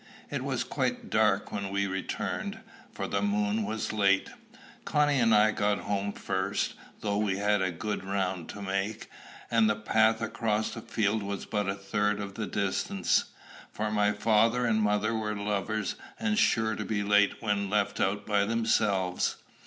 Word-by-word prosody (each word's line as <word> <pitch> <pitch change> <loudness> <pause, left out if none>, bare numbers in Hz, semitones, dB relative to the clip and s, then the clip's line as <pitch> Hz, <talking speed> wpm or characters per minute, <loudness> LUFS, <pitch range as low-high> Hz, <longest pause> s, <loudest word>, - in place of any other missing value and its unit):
It - - -2
was - - -1
quite - - -2
dark - - +2
when 100 -1 -3
we 100 0 0
returned, 95 0 -3 0.3
for - - -4
the 100 - -1
moon 105 +1 +1
was 110 +1 -3
late. 100 -2 +2 0.5
Connie 145 -2 +2
and 115 -2 +4
I 110 0 +5
got 105 -1 +1
home 100 0 -1
first, 95 0 -2 0.3
though 100 -1 0
we 100 -3 0
had 105 0 +2
a 95 - +1
good 105 +5 -4
round 95 -3 -2
to 100 - -7
make, 100 +2 -3 0.4
and 115 -2 +4
the 105 - +2
path 110 +1 +2
across 110 -1 -1
the 115 - -7
fields 110 -2 0
was 100 0 -4
but 105 -3 -1
a 100 - -1
third 105 +1 0
of 100 -1 -5
the 105 +1 -4
distance; 100 -1 0 0.5
for 110 0 -2
my 105 -1 +3
father 115 +3 +3
and 110 -2 +2
mother 105 +1 +1
were 110 -1 -2
lovers, 105 +1 -1 0.3
and 225 -1 +1
sure 110 -1 +2
to - - -4
be 105 -2 -1
late 105 0 +3
when 100 -2 -1
left 105 -1 0
out 105 +2 0
by 105 -1 +2
themselves. 100 -4 +1
105 Hz, 170 wpm, -29 LUFS, 100-110 Hz, 0.5 s, I